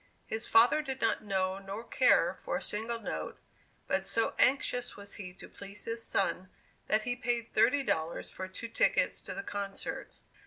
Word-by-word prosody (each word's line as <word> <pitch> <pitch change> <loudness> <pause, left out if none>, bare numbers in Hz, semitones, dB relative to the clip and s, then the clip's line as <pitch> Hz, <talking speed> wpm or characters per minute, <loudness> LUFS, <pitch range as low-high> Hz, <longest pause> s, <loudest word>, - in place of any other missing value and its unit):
His 220 +1 -2
father 235 +7 +6
did 265 -3 -4
not - - +1
know 190 -2 0
nor 195 +3 -6
care - - +4
for - - -4
a - - -1
single 225 +3 -1
note, 80 - -5 0.5
but 190 - 0
so 210 +4 +1
anxious 250 -2 +2
was 200 0 -7
he 180 -2 -7
to - - -11
please 200 +1 -9
his 230 0 -3
son, 185 -3 0 0.4
that 215 0 +2
he 245 +1 -1
paid 240 -2 -2
thirty 275 +4 +4
dollars 160 -8 -1
for 185 - -5
two 190 +5 -7
tickets - - +2
to - - -6
the 315 - -4
concert. 200 -4 -4
220 Hz, 180 wpm, -31 LUFS, 195-240 Hz, 0.5 s, father